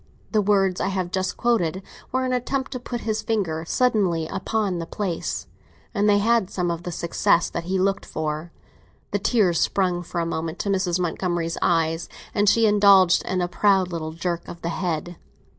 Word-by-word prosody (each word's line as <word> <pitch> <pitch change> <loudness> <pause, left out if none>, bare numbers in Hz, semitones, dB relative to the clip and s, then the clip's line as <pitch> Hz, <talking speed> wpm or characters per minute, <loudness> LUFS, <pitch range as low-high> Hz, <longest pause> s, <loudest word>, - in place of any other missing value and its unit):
The 215 - +3
words 195 -2 +2
I - - 0
have 185 -2 -2
just 185 -1 -1
quoted 190 -7 +1 0.3
were 260 0 0
an 255 - 0
attempt 265 +2 -2
to 255 - -4
put 240 -1 -5
his 220 0 -1
finger 180 -8 -1
suddenly 200 -10 +2
upon 190 +1 -2
the 165 - -5
place; 185 -4 -3 0.5
and 205 0 +2
they 205 - +5
had 220 -1 +2
some 175 -2 -1
of 170 0 -4
the 175 - -5
success 170 +1 +1
that 170 - -4
he 190 +2 0
looked 195 +1 0
for. 155 +2 -4 0.6
The 205 - 0
tears 200 -6 +2
sprang 180 -3 +1
for 175 0 -4
a 170 - 0
moment 165 0 -3
to 200 - -3
Mrs. 185 -2 +1
Montgomery's 175 -1 -1
eyes, 165 0 +1 0.2
and 205 -1 +3
she 230 +1 +4
indulged 200 -4 +5
in 185 -1 -1
a 175 - 0
proud 190 0 +2
little 160 -2 -4
jerk 170 0 -3
of 170 - -10
the 170 - -1
head. 175 -1 -3
185 Hz, 190 wpm, -24 LUFS, 170-205 Hz, 0.6 s, they